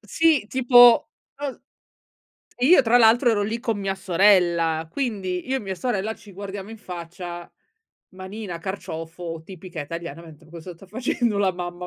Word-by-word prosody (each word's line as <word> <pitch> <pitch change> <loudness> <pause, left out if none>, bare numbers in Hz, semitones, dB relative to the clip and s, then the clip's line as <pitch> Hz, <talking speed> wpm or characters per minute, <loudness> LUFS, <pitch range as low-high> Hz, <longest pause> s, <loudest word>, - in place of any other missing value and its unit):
Sì, 290 +4 +2
tipo 245 -2 +6 0.3
es 285 -3 -5 1.0
e 250 - +3
io 325 -3 +7
tra 240 +1 +4
l'altro 235 +2 +5
ero 205 -2 +1
lì 225 +3 -3
con 225 -4 -2
mia 195 -1 -2
sorella, 170 -4 +2
quindi, 200 -9 -3
io 265 - +1
e - - -3
mia 190 -3 -5
sorella 220 -3 -2
ci 210 -1 -15
guardiamo 200 +1 -7
in 225 - -8
faccia 175 -2 -8 0.7
manina, 190 -1 -7
carciofo, 165 -2 -6
tipica 180 -2 -9
italiana, 165 +1 -7
mentre 160 -1 -15
"Ma - - -20
cosa 170 +1 -9
sta 195 - -16
facendo 230 0 -1
la 195 -2 +2
mamma?" 175 0 -6
195 Hz, 160 wpm, -23 LUFS, 175-225 Hz, 1.0 s, io